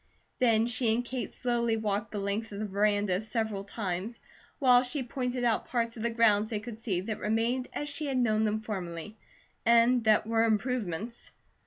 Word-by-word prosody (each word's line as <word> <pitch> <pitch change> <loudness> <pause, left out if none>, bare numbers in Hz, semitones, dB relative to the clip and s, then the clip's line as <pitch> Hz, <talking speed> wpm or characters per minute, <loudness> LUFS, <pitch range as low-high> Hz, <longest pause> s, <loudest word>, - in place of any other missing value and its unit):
Then 230 -3 +4
she 235 -1 +1
and 245 +1 -2
Kate 250 +1 -4
slowly 235 -2 0
walked 210 0 -2
the 210 - -4
length 205 +3 -2
of 200 - -6
the 215 - -2
veranda 205 -1 +1
several 220 -3 -2
times, 200 +2 -4 0.4
while 250 -3 +6
she 260 +2 -2
pointed 250 0 -3
out 235 -2 +1
parts 235 -2 -1
of 225 - -7
the 235 - +1
grounds 220 -2 +3
they 215 -3 -2
could 225 0 -8
see 195 -6 -1
that 215 +3 -4
remained 230 +4 0
as 295 - -4
she 290 +1 -4
had 270 -2 -1
known 220 -3 +2
them 215 0 0
formerly, 190 -2 -5 0.5
and 235 +1 +5
what 215 -1 +4
were 225 0 +2
improvements. 225 -2 -2
225 Hz, 185 wpm, -29 LUFS, 210-240 Hz, 0.5 s, while